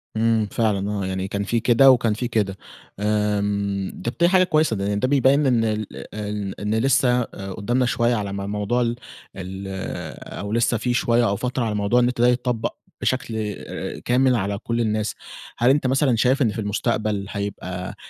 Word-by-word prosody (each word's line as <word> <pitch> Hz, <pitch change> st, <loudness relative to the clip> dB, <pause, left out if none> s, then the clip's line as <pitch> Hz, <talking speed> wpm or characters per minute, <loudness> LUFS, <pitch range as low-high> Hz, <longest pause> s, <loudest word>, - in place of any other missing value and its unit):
امم، 110 Hz, -1 st, +2 dB
فعلًا 105 Hz, -3 st, 0 dB
آه، 100 Hz, -2 st, -2 dB
يعني 95 Hz, 0 st, -3 dB
كان 100 Hz, +1 st, -2 dB
في 115 Hz, +3 st, 0 dB
كده 125 Hz, +4 st, +6 dB
وكان 115 Hz, -3 st, +2 dB
في 120 Hz, +3 st, -3 dB
كده. 105 Hz, -5 st, -1 dB, 0.4 s
آمم، 100 Hz, -2 st, -1 dB
طب، 120 Hz, -, -1 dB
دي 170 Hz, -, +5 dB
حاجة 185 Hz, 0 st, +5 dB
كويسة 155 Hz, -8 st, +2 dB
لأن 100 Hz, 0 st, -1 dB
ده 130 Hz, -, +1 dB
بيبين 140 Hz, +1 st, +3 dB
إن 120 Hz, -4 st, +3 dB
ال 110 Hz, -1 st, -1 dB, 0.3 s
إن 105 Hz, -2 st, -4 dB
إن 105 Hz, +1 st, -1 dB
لسه 125 Hz, +1 st, +3 dB
ق -, -, -12 dB, 0.2 s
قدامنا 120 Hz, +5 st, +1 dB
شوية 120 Hz, 0 st, +1 dB
على 100 Hz, -3 st, -3 dB
ما 100 Hz, 0 st, -4 dB
موضوع 105 Hz, +4 st, 0 dB
ال 120 Hz, -1 st, 0 dB, 0.4 s
ال 95 Hz, +1 st, -6 dB, 0.7 s
أو 100 Hz, 0 st, -5 dB
لسه 120 Hz, +1 st, +2 dB
في 125 Hz, +2 st, -1 dB
شوية 120 Hz, 0 st, +2 dB
أو 100 Hz, -, 0 dB
فترة 125 Hz, +3 st, -2 dB
على 110 Hz, -2 st, -1 dB
موضوع 105 Hz, +4 st, +2 dB
النت 120 Hz, -1 st, +1 dB
ده 120 Hz, -, +6 dB
يتطبق 125 Hz, -2 st, 0 dB, 0.3 s
بشكل 125 Hz, -3 st, -1 dB, 0.2 s
آآ، -, -, -6 dB
كامل 125 Hz, +1 st, +3 dB
على 100 Hz, -2 st, -1 dB
كل 115 Hz, +3 st, -2 dB
الناس. 110 Hz, -1 st, -1 dB, 0.4 s
هل 120 Hz, +1 st, +3 dB
أنت 135 Hz, -1 st, +3 dB
مثلًا 130 Hz, -1 st, +2 dB
شايف 125 Hz, +5 st, +2 dB
إن 115 Hz, -5 st, +3 dB
في 115 Hz, -, -5 dB
المستقبل 105 Hz, -1 st, -1 dB
هيبقى 95 Hz, -3 st, -5 dB
110 Hz, 185 wpm, -23 LUFS, 100-125 Hz, 0.7 s, كده